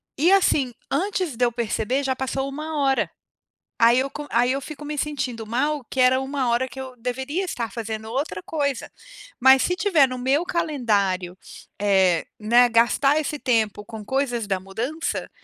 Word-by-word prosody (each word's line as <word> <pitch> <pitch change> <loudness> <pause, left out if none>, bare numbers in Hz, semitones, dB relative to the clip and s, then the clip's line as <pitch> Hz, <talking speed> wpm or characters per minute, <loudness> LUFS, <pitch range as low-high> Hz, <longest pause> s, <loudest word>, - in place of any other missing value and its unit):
e, 325 +6 +3
assim, 305 -9 +3 0.2
antes 360 - -1
de 245 - -1
eu 240 - +3
perceber 235 +3 -1
já 265 -1 0
passou 270 +1 -2
1 305 +2 -4
hora. 270 -1 +2 0.7
Aí 235 +2 +6
eu 270 - -1
co 295 0 -7
aí 245 +2 +3
eu 270 - 0
fico 305 0 -9
me 295 0 -5
sentindo 265 -6 -3
mal 275 +3 -1
que 265 - 0
era 255 +1 +5
1 265 -2 -1
hora 240 +2 +1
que 260 +1 -10
eu 260 -1 -8
deveria 265 +9 -3
estar 235 - -4
fazendo 220 -1 -5
outra 250 -9 -3
coisa. 280 -5 -2 0.5
Mas 265 +1 +7
se 360 - +1
tiver 330 -5 +4
no 255 - -5
meu 270 +6 +2
calendário, 205 - 0 0.4
eh, 190 -4 +3
né, 235 +3 +5
gastar 240 +5 +3
esse 300 -1 -3
tempo 220 -5 0
com 220 -1 -8
coisas 245 -1 -1
da 190 -2 0
mudança, 235 - -4
260 Hz, 175 wpm, -23 LUFS, 230-290 Hz, 0.7 s, Mas